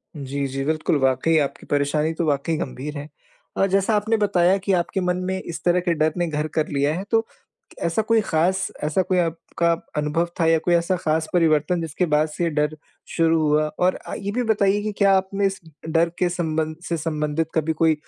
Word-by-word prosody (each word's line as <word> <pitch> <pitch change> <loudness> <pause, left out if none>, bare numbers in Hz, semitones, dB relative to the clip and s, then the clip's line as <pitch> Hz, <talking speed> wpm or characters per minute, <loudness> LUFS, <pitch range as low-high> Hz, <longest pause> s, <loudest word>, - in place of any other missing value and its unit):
जी, 140 -1 -3
जी, 135 +1 -3
बिल्कुल 155 0 +1
वाक़ई 135 +5 +2
आपकी - - -9
परेशानी 145 +2 +1
तो 165 +1 -2
वाक़ई 150 +2 0
गंभीर 145 +2 -5
है। 145 +1 -6 0.5
और 195 - +3
जैसा 195 +3 +2
आपने 220 +2 +1
बताया 195 -3 +3
कि 195 +1 -2
आपके 180 +2 0
मन 180 0 0
में 190 0 -1
इस 165 -1 -7
तरह 180 0 +3
के 175 -1 0
डर 155 0 +1
ने 175 - 0
घर 150 -1 -2
कर 155 -1 +1
लिया 140 +2 0
है, 185 - -4
तो 225 0 +3 0.6
ऐसा 170 +6 +1
कोई 225 +1 +3
ख़ास, 185 0 +1 0.2
ऐसा 155 +5 +1
कोई 185 0 0
आपका 170 0 0 0.2
अनुभव 150 +3 0
था 165 - +3
या 165 0 +4
कोई 175 - +3
ऐसा 170 +2 +2
ख़ास 160 -2 -1
परिवर्तन, 165 0 +2
जिसके 165 +3 -1
बाद 155 +1 +3
से 155 +3 -3
ये 170 - +1
डर 150 0 0 0.4
शुरू 165 -1 +3
हुआ? 155 +1 +3
और 180 +1 +3
अ, - - -7
ये 200 0 -4
भी 245 +3 0
बताइए 205 -2 +2
कि 215 0 -2
क्या 200 -1 +5
आपने 195 +1 0
इस 195 0 -3 0.3
डर 165 +1 +2
के 180 - +2
संबंध 160 -2 -2
से 170 - 0
संबंधित 155 0 -2
कभी 160 0 +1
कोई, 160 0 +3
165 Hz, 210 wpm, -23 LUFS, 155-185 Hz, 0.6 s, क्या